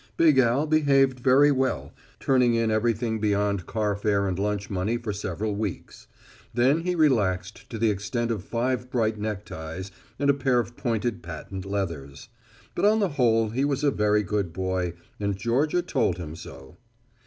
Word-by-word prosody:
Big 155 -5 +5
Al 130 +4 +3
behaved 140 -4 +3
very 135 +3 +5
well, 130 -1 -1 0.3
turning 125 -3 +3
in 115 -1 +1
everything 110 +1 0
beyond 100 -3 0
carfare 105 -2 0
and 95 -1 -2
lunch 105 0 -1
money 100 +4 -1
for 115 -3 -4
several 100 +2 -3
weeks. 105 -3 -5 0.5
Then 130 +6 +3
he 180 +1 -1
relaxed 110 - +1
to 115 - -5
the 110 0 +2
extent 115 +4 -2
of 105 -5 -3
five 125 +3 -2
bright 110 -4 0
neckties 95 -4 -5 0.3
and 140 - 0
a - - +1
pair 135 -2 +1
of 120 0 -1
pointed 115 -5 -2
patent 90 +3 -7
leathers. 85 -9 -4 0.4
But - - 0
on 215 +1 +4
the 200 -3 +1
whole 115 -6 +2
he 125 +5 -1
was 140 0 0
a 145 - +4
very 105 -2 +2
good 100 -2 -1
boy, 95 -1 -2 0.3
and 100 -2 -1
Georgia 140 - +1
told 125 - 0
him 80 -3 -7
so. 65 -4 -12
110 Hz, 165 wpm, -26 LUFS, 100-130 Hz, 0.5 s, Big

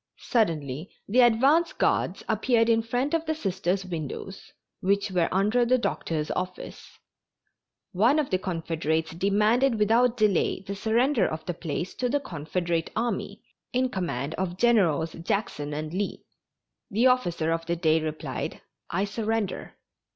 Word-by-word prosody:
Suddenly 160 - -1 0.2
the 235 +6 +2
advance 270 +8 +4
guards - - 0
appeared 235 -2 +2
in 225 0 +4
front 245 +6 -1
of 330 -1 0
the 315 - 0
Sisters' 190 - -1
windows, 175 +3 -6 0.3
which 200 +1 +1
were 175 -3 +1
under 210 +6 +2
the 250 +2 +3
doctor's 160 -9 -2
office. 180 0 -6 0.9
One 225 +10 +3
of 300 -3 0
the 185 - +2
Confederates 160 -3 -2
demanded 210 +8 +2
without 230 +3 +3
delay 210 -4 +2
the 195 - -5
surrender 230 +5 +2
of 155 0 -5
the 175 - -2
place 170 +2 -4
to 250 - 0
the 290 +3 +1
Confederate 170 - -2
army, 235 +1 -2 0.3
in 255 +1 +2
command 160 - -3
of 180 -1 -2
Generals 175 -9 +3
Jackson 165 -4 -2
and 155 +2 -4
Lee. 200 +2 -3 0.7
The 225 +3 +2
officer 175 -11 +2
of 165 0 -2
the 170 - 0
day 160 -2 +2
replied, 155 0 -4 0.3
"I 190 +4 0
surrender." 220 -1 -3
195 Hz, 145 wpm, -26 LUFS, 165-235 Hz, 0.9 s, advance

